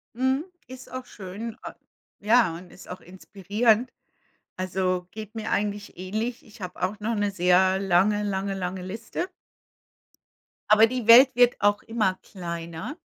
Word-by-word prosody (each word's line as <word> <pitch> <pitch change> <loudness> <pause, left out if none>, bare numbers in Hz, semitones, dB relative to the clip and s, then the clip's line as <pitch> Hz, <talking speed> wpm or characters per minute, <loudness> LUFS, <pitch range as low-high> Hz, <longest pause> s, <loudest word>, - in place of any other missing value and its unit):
Mhm. 260 +5 0 0.2
Ist 260 0 -11
auch 255 0 -6
schön. 210 +4 -8
A - - -8 0.4
ja, 215 -4 +3
und 175 +1 -11
ist - - -14
auch 180 +1 -8
inspirierend. 210 +6 0 0.7
Also, 185 -1 -1
geht 215 +1 -9
mir 220 0 -4
eigentlich 205 -2 -2
ähnlich. 215 +6 -4
Ich 215 -1 -16
habe 180 - -7
auch 200 +3 -2
noch 225 +2 -2
'ne 205 -1 0
sehr 185 +1 +3
lange, 195 +2 +2
lange, 195 -1 -2
lange 185 0 -4
Liste. 230 - -5 1.4
Aber 215 +1 +7
die 245 -2 -4
Welt 255 +4 +9
wird 245 0 +5
auch 205 0 +2
immer 215 -5 0
kleiner. 170 - -7
205 Hz, 145 wpm, -25 LUFS, 185-230 Hz, 1.4 s, Welt